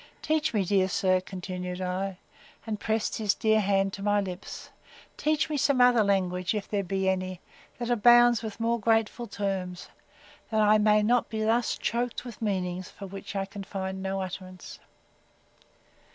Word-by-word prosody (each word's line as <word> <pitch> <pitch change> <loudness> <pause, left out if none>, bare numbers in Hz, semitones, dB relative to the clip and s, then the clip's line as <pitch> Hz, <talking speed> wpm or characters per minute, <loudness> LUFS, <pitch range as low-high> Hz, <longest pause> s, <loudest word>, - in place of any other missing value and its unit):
Teach 310 0 +1
me, 205 -4 0
dear 190 0 +2
sir, 185 -1 +2
continued 180 -1 -6
I, 185 +1 -3 0.5
and 215 -2 -3
pressed 220 0 -1
his 210 -3 +1
dear 220 0 +3
hand 195 -1 +1
to 195 - -6
my 205 0 +2
lips, 185 -2 -6 0.4
teach 305 0 +1
me 305 - -2
some 280 -1 +2
other 245 -2 +6
language, 185 -1 0
if 210 - -3
there 200 -2 -1
be 190 +1 -1
any, 185 -1 -1 0.4
that 240 0 -3
abounds 240 0 +6
with 220 -2 -6
more 230 +1 +1
grateful 225 +2 +1
terms; 195 -3 -4 0.6
that 220 - 0
I 215 0 +5
may 210 0 +4
not 240 +3 +2
thus 225 +2 0
be - - -20
choked 240 +2 -1
with 235 -2 -9
meanings, 185 -3 -2
for 200 - -10
which 195 +2 -8
I 195 -1 -1
can 200 +1 -8
find 190 -1 -5
no 195 0 -2
utterance. 185 0 -8
200 Hz, 165 wpm, -28 LUFS, 190-225 Hz, 0.6 s, other